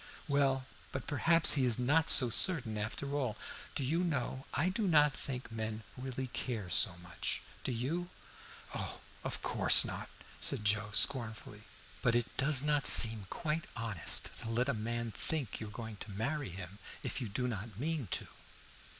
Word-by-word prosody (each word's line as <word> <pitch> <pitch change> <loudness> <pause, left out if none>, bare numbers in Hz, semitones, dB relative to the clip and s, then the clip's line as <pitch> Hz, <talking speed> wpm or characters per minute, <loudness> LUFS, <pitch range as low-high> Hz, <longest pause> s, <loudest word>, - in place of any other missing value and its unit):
"Well, 135 -2 +1 0.3
but 135 - -5
perhaps 165 +3 +4
he 140 - +1
is 120 -3 +3
not 145 +6 +2
so 125 -4 +5
certain, 125 - +3
after 110 +7 -4
all. 130 -7 -2 0.4
Do 140 - -1
you 165 +7 0
know, 135 -5 -3
I 170 +6 +1
do 205 +2 -1
not 150 -4 +4
think 130 -4 -6
men 110 0 -4
really 130 0 -5
care 115 -6 -4
so 95 -5 +3
much; 85 -1 -4 0.2
do - - -2
you?" 155 +10 -3 0.6
"Oh, - - -5 0.2
of - - -4
course - - +7
not," - - -5 0.3
said 105 - -1
Joe 105 0 +1
scornfully. 110 -3 +2 0.4
"But 115 - +2
it 120 0 -1
does 135 -1 +3
not 150 -1 +2
seem 110 -4 +7
quite 160 0 -3
honest 115 -8 0
to 115 - -6
let 120 +3 0
a - - +1
man 115 +1 -3
think 145 -1 -4
you 110 - -6
are - - -9
going 110 0 -8
to 105 - -9
marry 130 +8 -3
him 95 +2 -9 0.2
if - - -4
you 120 - -4
do 125 +5 -2
not 110 -3 -6
mean 150 -1 -3
to." - - -3
125 Hz, 175 wpm, -33 LUFS, 110-145 Hz, 0.6 s, course